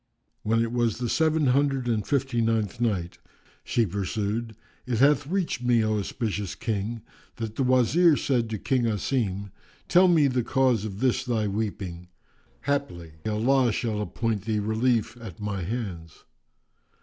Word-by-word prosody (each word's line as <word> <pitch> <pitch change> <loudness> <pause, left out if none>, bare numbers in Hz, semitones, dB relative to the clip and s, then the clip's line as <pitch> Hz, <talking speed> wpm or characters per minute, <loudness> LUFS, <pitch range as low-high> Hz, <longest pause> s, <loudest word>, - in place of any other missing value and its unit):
When 115 +2 +2
it 115 - -3
was 120 -3 0
the 120 0 -2
Seven 160 +3 +2
Hundred 135 -1 +2
and 110 -4 0
Fifty 135 -4 0
ninth 110 -2 0
Night, 95 -7 -1 0.4
She 115 - +1
pursued, 105 +4 -3 0.3
It 120 -3 0
hath 140 +2 +4
reached 180 -6 -1
me, 120 -2 +3
O 110 -1 +1
auspicious 105 -2 -3
King, 110 0 -3 0.3
that 115 -2 -5
the - - -2
Wazir 135 +6 +4
said 120 -4 0
to 110 - -3
King 125 +3 0
Asim, 100 -2 -1 0.4
"Tell 185 +1 +6
me 165 -4 +5
the 130 -2 +1
cause 125 -3 +1
of 100 0 -6
this 130 -2 +2
thy 110 -4 0
weeping: 95 -4 -4 0.5
haply 140 - -2 0.2
Allah 120 +4 +2
shall 105 -1 -2
appoint 105 -1 -2
thee 110 -1 0
relief 110 +3 0
at 105 -6 -9
my 100 -2 -3
hands." 90 -5 -5
115 Hz, 150 wpm, -26 LUFS, 105-130 Hz, 0.5 s, Tell